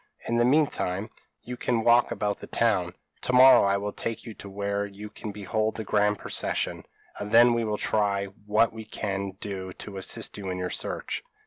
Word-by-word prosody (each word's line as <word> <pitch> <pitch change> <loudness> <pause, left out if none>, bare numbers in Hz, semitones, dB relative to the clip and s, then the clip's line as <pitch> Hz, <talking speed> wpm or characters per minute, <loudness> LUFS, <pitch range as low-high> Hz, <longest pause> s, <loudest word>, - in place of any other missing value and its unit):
In 115 - +1
the 120 - +4
mean 150 +5 +5
time, 100 -4 -3 0.3
you 125 - -6
can 120 -2 0
walk 120 +1 +5
about 105 -1 -2
the - - -9
town; 100 -7 +1 0.3
to 125 - -2
morrow 130 +1 +8
I 100 0 +2
will 100 +1 -4
take 115 - -4
you 115 - -7
to 100 - -10
where 100 +1 -2
you 100 +1 -8
can 105 0 -7
behold 110 +2 -2
the 110 - -4
grand 105 0 +2
procession, - - -1 0.3
and 105 0 -5
then 120 +1 +7
we 115 0 0
will 105 -1 -1
try 100 -2 +1 0.2
what 110 +2 +3
we 110 -1 -7
can 100 -2 -4
do 95 -2 -5
to 100 -2 -8
assist 95 +2 -2
you 95 -2 -5
in 90 - -3
your 90 0 -3
search." - - -3
105 Hz, 205 wpm, -27 LUFS, 100-115 Hz, 0.3 s, morrow